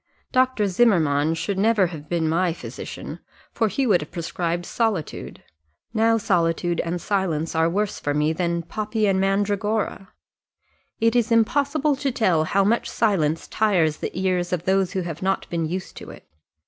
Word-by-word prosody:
Dr. 255 Hz, -4 st, +2 dB
Zimmermann 165 Hz, -8 st, +3 dB
should 190 Hz, +4 st, -2 dB
never 215 Hz, -1 st, +3 dB
have 150 Hz, -1 st, -9 dB
been 170 Hz, -2 st, 0 dB
my 170 Hz, +2 st, +1 dB
physician, -, -, -8 dB, 0.3 s
for 225 Hz, -, +1 dB
he 270 Hz, +6 st, -1 dB
would 195 Hz, -9 st, +3 dB
have 150 Hz, -, -7 dB
prescribed 170 Hz, 0 st, -3 dB
solitude. 215 Hz, -9 st, -3 dB, 0.5 s
Now 225 Hz, 0 st, +3 dB
solitude 175 Hz, -3 st, 0 dB
and 170 Hz, +1 st, -2 dB
silence 170 Hz, -5 st, -1 dB
are 160 Hz, 0 st, +2 dB
worse 205 Hz, +4 st, -1 dB
for 145 Hz, 0 st, -2 dB
me 150 Hz, +1 st, +2 dB
than 170 Hz, 0 st, -1 dB
poppy 215 Hz, +5 st, -2 dB
and 190 Hz, -1 st, +2 dB
mandragora. 205 Hz, +1 st, -1 dB, 0.9 s
It 230 Hz, +1 st, +2 dB
is 235 Hz, -1 st, +2 dB
impossible 285 Hz, +6 st, +2 dB
to 275 Hz, 0 st, -1 dB
tell 185 Hz, -11 st, +2 dB
how 195 Hz, +4 st, +2 dB
much 225 Hz, +4 st, +1 dB
silence 165 Hz, -8 st, 0 dB
tires 175 Hz, -8 st, +1 dB
the -, -, -3 dB
ears 185 Hz, -2 st, 0 dB
of 175 Hz, -2 st, -1 dB
those 190 Hz, -1 st, +1 dB
who 190 Hz, -, -1 dB
have 170 Hz, -2 st, -6 dB
not 190 Hz, +1 st, -1 dB
been 165 Hz, -2 st, -1 dB
used 180 Hz, +3 st, -5 dB
to -, -, -9 dB
it. -, -, -13 dB
190 Hz, 165 wpm, -23 LUFS, 165-220 Hz, 0.9 s, Zimmermann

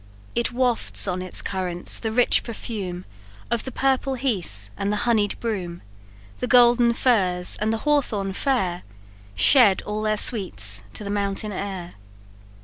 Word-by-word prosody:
"It 235 Hz, -, -1 dB
wafts 245 Hz, -4 st, +2 dB
on 180 Hz, -1 st, -2 dB
its 185 Hz, -1 st, -5 dB
currents 180 Hz, -2 st, -2 dB
the 225 Hz, -, -3 dB
rich 245 Hz, +2 st, +3 dB
perfume 200 Hz, -6 st, -6 dB, 0.5 s
Of 235 Hz, -2 st, 0 dB
the 260 Hz, -, -5 dB
purple 270 Hz, +1 st, 0 dB
heath, 185 Hz, -, -3 dB
and 200 Hz, +1 st, -2 dB
the 210 Hz, -, -1 dB
honied 215 Hz, -4 st, +1 dB
broom; 185 Hz, -7 st, -4 dB, 0.6 s
The 250 Hz, -, -2 dB
golden 240 Hz, -1 st, +5 dB
furze, 185 Hz, -8 st, +1 dB
and 215 Hz, +1 st, +1 dB
the 225 Hz, -, 0 dB
hawthorn 225 Hz, -10 st, 0 dB
fair, 190 Hz, -8 st, -1 dB, 0.5 s
Shed 235 Hz, -9 st, +5 dB
all 210 Hz, +1 st, -4 dB
their 215 Hz, 0 st, 0 dB
sweets 110 Hz, -, +2 dB
to -, -, -6 dB
the 200 Hz, -, -5 dB
mountain 205 Hz, +1 st, -2 dB
air. 190 Hz, -3 st, -6 dB
210 Hz, 145 wpm, -23 LUFS, 185-240 Hz, 0.6 s, golden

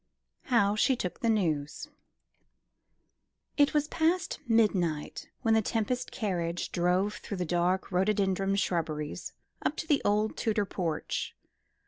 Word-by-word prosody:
How 210 Hz, -5 st, +3 dB
she 260 Hz, +5 st, +3 dB
took 180 Hz, -6 st, -4 dB
the 230 Hz, -, +1 dB
News. 165 Hz, -, 0 dB, 1.7 s
It 290 Hz, 0 st, +3 dB
was 295 Hz, 0 st, +2 dB
past 325 Hz, +3 st, 0 dB
midnight 190 Hz, -9 st, +1 dB
when 225 Hz, -, +3 dB
the 220 Hz, -, +4 dB
Tempest 230 Hz, +4 st, -1 dB
carriage 175 Hz, -5 st, -2 dB
drove 180 Hz, +4 st, +1 dB
through 200 Hz, -, -6 dB
the 180 Hz, -, -1 dB
dark 175 Hz, +3 st, 0 dB
rhododendron 195 Hz, 0 st, +1 dB
shrubberies 160 Hz, -6 st, -2 dB, 0.3 s
up 300 Hz, -, 0 dB
to -, -, -3 dB
the 300 Hz, -3 st, +2 dB
old 210 Hz, +1 st, +1 dB
Tudor 215 Hz, -3 st, +1 dB
porch. 170 Hz, -5 st, -3 dB
200 Hz, 125 wpm, -29 LUFS, 175-225 Hz, 1.7 s, the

